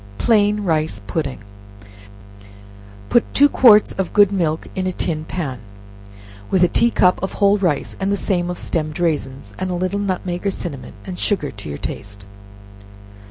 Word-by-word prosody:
Plain 210 -2 +2
Rice 155 - -1
Pudding. 135 - -4 1.7
Put 240 - +1
two 285 - +7
quarts 220 -7 +6
of 190 -2 -3
good 205 -2 +5
milk 165 -5 -1
in 185 0 -2
a - - 0
tin 155 -3 -3
pan, 145 -8 -4 0.9
with 185 -2 +3
a - - +6
tea 235 +7 +3
cup 180 -5 +2
of 190 - -3
whole 200 0 +3
rice, 175 -7 0
the 200 +1 0
same 180 -3 -1
of 180 - -4
stemmed 155 -1 -2
raisins, 135 -10 -2
and 185 - -2
a 180 - -2
little 185 +3 -1
nutmeg 185 -1 -2
or - - +3
cinnamon, 160 -8 -6
and 185 -2 -7
sugar 185 -9 0
to 100 -6 -9
your 70 - -5
taste. 100 +4 -7
180 Hz, 160 wpm, -20 LUFS, 155-200 Hz, 1.7 s, two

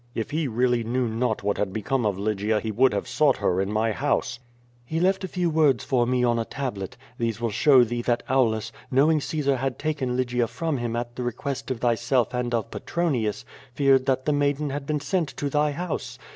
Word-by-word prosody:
If 110 - -3
he 155 0 0
really 120 0 +1
knew 125 +2 0
not 115 -1 -1
what 100 0 0
had 105 -2 0
become 110 +4 -1
of 100 -3 -1
Lygia 105 +1 0
he 110 +1 -3
would 130 +5 +4
have 100 - -2
sought 150 -3 +3
her 90 +2 +1
in 95 +1 -2
my 110 +1 +1
house.*' 135 0 -1 0.4
He 160 +6 -3
left 190 +2 +2
a - - -2
few 180 -1 -1
words 145 -5 +3
for 130 -2 +1
me 125 0 +1
on 120 -1 +2
a - - 0
tablet. 115 -10 -5 0.2
These 115 -2 -1
will 115 -1 -1
show 130 +3 +6
thee 120 +1 -2
that 120 0 0
Aulus, 115 -5 +1 0.2
knowing 150 +3 +3
Caesar 140 -2 0
had 135 0 -2
taken 140 -5 -2
Lygia 125 -2 0
from 160 +3 -2
him 120 -1 -2
at 120 0 -4
the - - -5
request 135 +3 -4
of 130 -3 -3
thyself 120 +1 +1
and 125 -1 -1
of 115 0 -3
Petronius, 130 -9 -1 0.3
feared 135 -1 +3
that 130 -1 +1
the 150 - +2
maiden 145 0 0
had 140 0 -5
been 150 -1 0
sent 160 +1 -1
to 140 -1 -2
thy 150 +1 +2
house. 170 +3 -4
125 Hz, 215 wpm, -25 LUFS, 115-140 Hz, 0.4 s, show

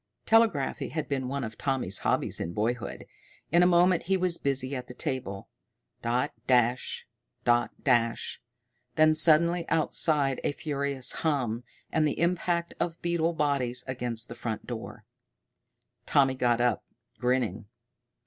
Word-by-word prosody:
Telegraphy 220 -12 +2
had 155 -1 -3
been 135 -2 -2
one 140 +1 -3
of 110 -2 -7
Tommy's 130 -9 -1
hobbies - - 0
in 85 - -4
boyhood. 115 +3 -2 0.5
In 170 +2 +5
a 180 - +6
moment 175 0 +4
he 190 - +3
was 180 -2 0
busy 135 -1 -2
at 125 -1 -6
the 125 - -10
table. 130 -10 -4 0.5
Dot 125 +5 0 0.2
dash 125 -1 +1 0.4
dot 120 0 +3
dash! 115 -3 +1 0.5
Then 155 0 +5
suddenly 165 +2 +5
outside 150 -3 +1
a - - 0
furious 140 -3 -1
hum, 125 -7 0 0.3
and 155 -1 +2
the 145 - -3
impact 170 0 0
of 165 -1 -2
beetle 170 -1 +1
bodies 135 -5 0
against 120 -3 -2
the - - -8
front 115 -2 -5
door. 110 -3 -7 1.0
Tommy 135 -3 +4
got 120 -2 +1
up, 120 -3 +1 0.4
grinning. 125 -5 0
135 Hz, 140 wpm, -28 LUFS, 120-160 Hz, 1.0 s, a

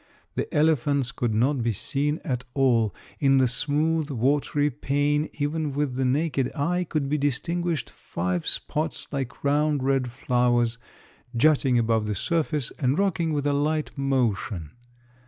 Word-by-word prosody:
The - - -3
elephants 145 -4 +2
could 120 -4 -1
not 130 +4 +2
be 115 -1 0
seen 145 - -2
at 125 -4 -2
all; 120 -6 +2 0.2
in 135 -1 +4
the 130 -1 +4
smooth 150 +5 +1
watery 145 +3 +1
pane 145 +3 0
even 150 0 -2
with 145 -2 -1
the 130 +1 -1
naked 140 0 0
eye 180 +5 0
could 155 -3 -1
be 150 +2 0
distinguished 165 +4 -1
five 90 -1 -3
spots 155 +1 -1
like 135 -3 -4
round 145 0 +2
red 135 -2 +1
flowers, 120 -2 +1 0.6
jutting 135 -2 +4
above 115 -2 +1
the 105 - -1
surface 155 - -1
and 135 +1 +1
rocking 170 -5 +1
with 145 -2 -1
a 145 - +2
light 150 +2 -1
motion. 115 - -1
140 Hz, 145 wpm, -25 LUFS, 125-150 Hz, 0.6 s, in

